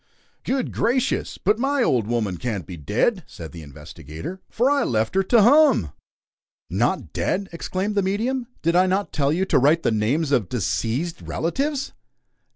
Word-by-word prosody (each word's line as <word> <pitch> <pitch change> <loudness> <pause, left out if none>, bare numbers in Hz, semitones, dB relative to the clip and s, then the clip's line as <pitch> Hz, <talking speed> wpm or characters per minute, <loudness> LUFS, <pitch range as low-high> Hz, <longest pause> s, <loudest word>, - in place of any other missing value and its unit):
"Good 260 -1 -1
gracious! 255 +2 0
But 210 +4 +1
my 275 0 +1
old 120 - +1
woman 110 -6 -1
can't 105 -6 -3
be 90 - -8
dead," 110 - 0
said 80 -2 -10
the 85 - -9
investigator, 80 - -9
"for 250 +5 +1
I 285 -1 +2
left 110 -2 0
her 195 - +3
tu 220 +4 +4
hum!" 270 - +5 0.8
"Not 120 - -1
dead!" 195 +1 -1
exclaimed 185 +4 -3
the 205 - +2
medium. 230 +6 -1 0.2
"Did 170 +2 +2
I 185 +1 +5
not 195 +2 -1
tell 140 -1 +1
you 180 +5 +1
to 190 - +3
write 155 +5 +3
the - - +2
names 130 +8 0
of 115 -10 +1
deceazed 125 - -2
relatives?" 275 - -2
170 Hz, 165 wpm, -23 LUFS, -, 0.8 s, hum